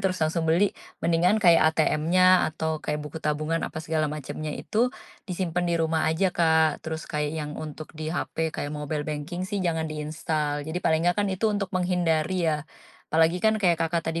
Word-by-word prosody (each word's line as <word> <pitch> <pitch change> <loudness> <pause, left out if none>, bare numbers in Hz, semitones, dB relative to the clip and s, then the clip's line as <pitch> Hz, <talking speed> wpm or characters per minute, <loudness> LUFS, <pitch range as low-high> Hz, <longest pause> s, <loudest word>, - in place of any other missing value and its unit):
terus 190 -1 0
langsung 160 +1 -1
beli 180 +5 +3 0.3
mendingan 170 +4 +3
kayak 170 -3 +6
ATMnya 175 +4 +4
atau 160 0 -2
kayak 150 - -2
buku 150 +2 -7
tabungan 155 +2 0
apa - - -10
segala 160 -1 0
macemnya 150 +1 -5
itu 235 +4 +1 0.4
disimpen 180 -1 -1
di 170 - +2
rumah 160 -1 +1
aja 175 +4 +1
Kak, 160 -2 +3
terus 160 0 -4
kayak 150 0 -1
yang 150 -1 -4
untuk 155 0 -7
di 155 0 -3
hape 160 -2 -2
kayak 145 - -4
mobile 150 0 -3
banking 155 +5 -4
sih 200 0 -2
jangan 165 -2 0
di-install 150 -1 -2
jadi 165 +3 -2
paling 160 -2 +2
enggak 175 - +3
kan - - -1
itu 190 +4 -3
untuk 205 -2 -1
menghindari 175 -1 +1
ya, 150 -2 -1 0.5
apalagi 160 +2 +4
kan 220 0 +4
kayak 175 -4 +3
Kakak, 165 0 -1
tadi 165 - -2
160 Hz, 185 wpm, -26 LUFS, 155-175 Hz, 0.5 s, kayak